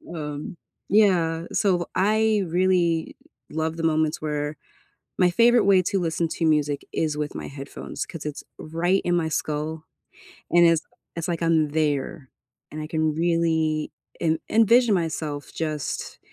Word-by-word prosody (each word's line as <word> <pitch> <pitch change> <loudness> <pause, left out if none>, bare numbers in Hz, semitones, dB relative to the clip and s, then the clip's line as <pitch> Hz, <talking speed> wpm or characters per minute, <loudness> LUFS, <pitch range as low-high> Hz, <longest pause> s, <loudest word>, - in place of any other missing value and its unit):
Um, 150 +1 -6 0.3
yeah. 175 -5 +3
So 180 -4 +1
I 215 +1 +2
really 175 -1 +1 0.3
love 160 +1 -2
the 165 - -4
moments 155 -1 +1
where 150 0 -3 0.6
my 180 -1 +5
favorite 235 +5 +4
way 190 -2 +5
to 195 +2 0
listen 165 -1 -1
to 165 - -2
music 150 -2 +1
is 155 -2 0
with 150 0 -3
my - - -5
headphones 140 0 -7
‘cause 165 -4 -9
it's 150 -1 -5 0.2
right 175 +4 0
in 175 0 +2
my 165 -2 +1
skull 155 +1 -3 0.7
and 175 0 +5
it's 165 -1 +4 0.4
it's 165 - -3
like 170 -1 -2
I'm 160 -2 +3
there 145 -3 -1 0.4
and 155 0 -6
I 155 - -5
can 155 -1 0
really 160 -2 +1 0.3
en 160 -1 +1
envision 230 +1 +5
myself 155 -4 -3
just 155 -4 -4
160 Hz, 145 wpm, -24 LUFS, 155-175 Hz, 0.7 s, my